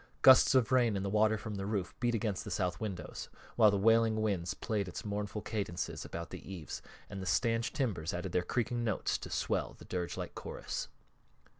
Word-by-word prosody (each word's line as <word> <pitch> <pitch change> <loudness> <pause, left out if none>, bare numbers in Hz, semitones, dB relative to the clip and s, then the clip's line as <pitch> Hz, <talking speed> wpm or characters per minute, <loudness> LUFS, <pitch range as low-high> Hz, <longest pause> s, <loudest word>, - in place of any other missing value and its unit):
Gusts 130 0 +8
of 130 -2 +4
rain 120 -4 +4
and 95 - -2
the 100 - -1
water 110 +1 +4
from 110 0 -6
the 95 - -3
roof 100 -4 -2
beat 120 -1 +1
against 105 -4 -1
the - - -7
south 90 -2 -1
windows, 95 -7 -5 0.3
while 110 -3 +7
the 100 - +2
wailing 115 +1 +4
wind 95 -5 0
played 105 -4 -1
its 90 - -6
mournful 105 0 -3
cadences 100 -6 -3
about 85 -2 -6
the - - -7
eaves, 85 -6 -6 0.3
and 100 -2 -6
the 95 - -5
stanch 115 +6 +2
timbers 95 - -1
added 90 +1 -3
their 90 - +2
creaking 120 +5 -1
notes 110 -4 0
to - - -7
swell - - -1
the - - -13
dirgelike 90 -2 -3
chorus. - - -5
105 Hz, 195 wpm, -33 LUFS, 90-115 Hz, 0.3 s, Gusts